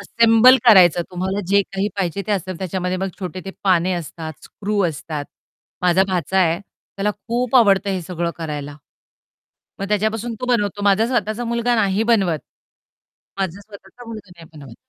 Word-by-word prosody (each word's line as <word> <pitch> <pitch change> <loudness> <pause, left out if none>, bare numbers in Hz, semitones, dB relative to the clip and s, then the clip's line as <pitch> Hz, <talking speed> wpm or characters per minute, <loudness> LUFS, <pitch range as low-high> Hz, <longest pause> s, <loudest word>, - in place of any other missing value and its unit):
Assemble 230 +4 +5
करायचं 180 -7 +6
तुम्हाला 190 +2 -2
जे 200 +2 +4
काही 195 +1 -3
पाहिजे 195 0 -2
ते 215 - 0
असेल 185 -2 -3
त्याच्यामध्ये 185 0 -2
मग 190 +1 -2
छोटे 185 0 -5
ते 195 - -5
पाने 185 -1 +3
असतात, 160 -1 -6
स्क्रू 205 0 -3
असतात. 150 -1 -5 0.6
माझा 180 +1 +4
भाचा 185 0 0
आहे 170 -2 +3
त्याला 200 0 -5
खूप 240 +5 -1
आवडतं 200 -4 +4
हे 190 -1 -1
सगळं 170 0 -3
करायला. 145 -3 -6 1.0
मग 195 - -4
त्याच्यापासून 220 +3 -1
तो 250 - -3
बनवतो, 205 -4 0
माझा 200 +2 +3
स्वतःचा 235 -2 -1
मुलगा 235 +1 0
नाही 200 -2 +1
बनवत. 185 -8 +2 1.0
माझा 190 0 -3
स्वतःचा 205 +3 -14
मुलगा 215 -4 -9
नाही 165 - -13
बनवत. 140 -6 -12
195 Hz, 155 wpm, -20 LUFS, 175-215 Hz, 1.0 s, करायचं